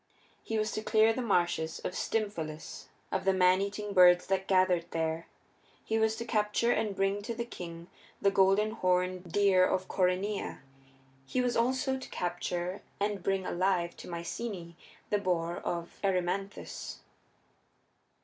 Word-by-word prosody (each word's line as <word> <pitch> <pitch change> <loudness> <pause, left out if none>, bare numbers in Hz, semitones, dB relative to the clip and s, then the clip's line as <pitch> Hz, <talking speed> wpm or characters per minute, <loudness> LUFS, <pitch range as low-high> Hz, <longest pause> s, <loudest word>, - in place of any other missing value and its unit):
He 225 - -3
was 215 0 0
to 215 - -3
clear 220 +1 +4
the 255 - -2
marshes 175 -7 +1
of - - -4
Stymphalus 170 -10 -3 0.2
of 190 - -1
the 195 - +3
maneating 200 +3 +2
birds 180 -1 +7
that 190 0 -1
gathered 185 -3 +3
there; 160 0 -2 0.6
he 220 0 0
was 220 0 +2
to 235 - -5
capture 215 +1 +1
and 215 -3 0
bring 195 +1 +1
to 230 +3 -4
the 235 +1 -3
king 170 -6 -8 0.3
the 200 - +3
golden 195 +2 +4
horned 180 -3 0
deer 195 -1 +4
of 185 0 +1
Coryneia; 190 +2 0 0.7
he 255 - -1
was 245 -1 +1
also 260 +3 +1
to - - -9
capture 175 +1 -3 0.2
and 205 -1 -1
bring 195 +1 0
alive 175 -1 0
to - - -10
Myceaæ 170 +1 -5 0.4
the 205 - +3
boar 175 -3 -1
of 170 0 -4
Erymanthus. 195 +1 -2
195 Hz, 145 wpm, -31 LUFS, 180-215 Hz, 0.7 s, birds